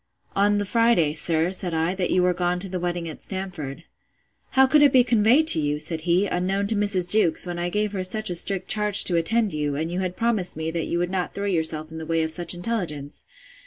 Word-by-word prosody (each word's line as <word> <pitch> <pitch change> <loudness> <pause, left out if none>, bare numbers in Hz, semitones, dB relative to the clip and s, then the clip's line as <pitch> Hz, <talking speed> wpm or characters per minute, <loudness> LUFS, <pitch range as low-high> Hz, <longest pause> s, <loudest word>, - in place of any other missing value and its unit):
On 205 +1 +2
the 205 - -2
Friday, 230 -8 +2
sir, 165 +2 0
said 180 -3 0
I, 165 +3 0
that 185 -2 -2
you 180 - +2
were 180 0 +2
gone 175 0 -1
to 195 - -4
the 185 -1 -5
wedding 175 -1 -3
at 160 - -9
Stamford.—How 185 - -4
could 295 +3 +3
it 290 -2 +5
be 255 -1 +5
conveyed 240 +5 +3
to - - +6
you, 145 0 -1
said 160 +1 0
he, 180 +4 +3
unknown 195 +2 -1
to 225 - 0
Mrs. 200 -4 +2
Jewkes, 210 -6 +3
when 175 -1 -5
I 175 0 -2
gave 210 +2 -1
her 190 -2 -4
such 215 +2 +1
a - - -3
strict 190 +1 -1
charge 210 -1 +4
to 175 - -1
attend 205 +5 0
you, 150 -2 -2
and 160 +3 -3
you 180 - -3
had 185 -1 -4
promised 220 -8 0
me, 160 0 -3
that 165 -1 -3
you 170 - -2
would 175 +1 -2
not 185 -2 -3
throw 200 - -4
yourself 160 -4 -1
in 160 - -8
the 160 - -8
way 165 -1 0
of 160 - -3
such 175 +1 -3
intelligence? 175 -8 -5
180 Hz, 240 wpm, -23 LUFS, 165-205 Hz, -, to